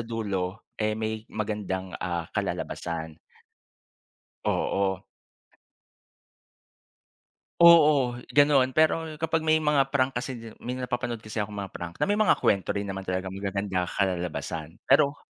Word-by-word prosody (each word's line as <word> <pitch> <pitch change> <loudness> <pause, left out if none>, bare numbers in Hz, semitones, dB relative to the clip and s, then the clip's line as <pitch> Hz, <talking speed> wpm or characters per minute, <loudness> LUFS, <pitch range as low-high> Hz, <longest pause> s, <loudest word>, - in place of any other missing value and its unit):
dulo, 105 -3 -3 0.2
eh 105 0 0
may 110 0 -4
magandang 100 -3 -3
ah 85 -2 -2
kalalabasan. 80 -2 -4 1.3
Oo. 95 0 0 2.6
Oo, 150 -7 +7 0.2
ganun. 145 -3 +4
Pero 155 +2 +1
kapag 160 0 0
may 155 0 +4
mga 145 -3 +2
prank 135 -1 +1
kasi 120 -3 -5
may 125 +1 -3
napapanood 120 -2 -3
kasi 110 0 -4
akong 105 0 -5
mga 95 -2 -5
prank 85 -1 -6
na - - +2
may 205 - +2
mga 215 - +4
kwento 100 -2 +1
rin 100 0 -3
naman 95 0 -4
talagang 95 0 -3
magagandang 100 -2 -2
kalalabasan, 85 -3 -2
pero 140 +1 +4
110 Hz, 120 wpm, -27 LUFS, 95-135 Hz, 2.6 s, Oo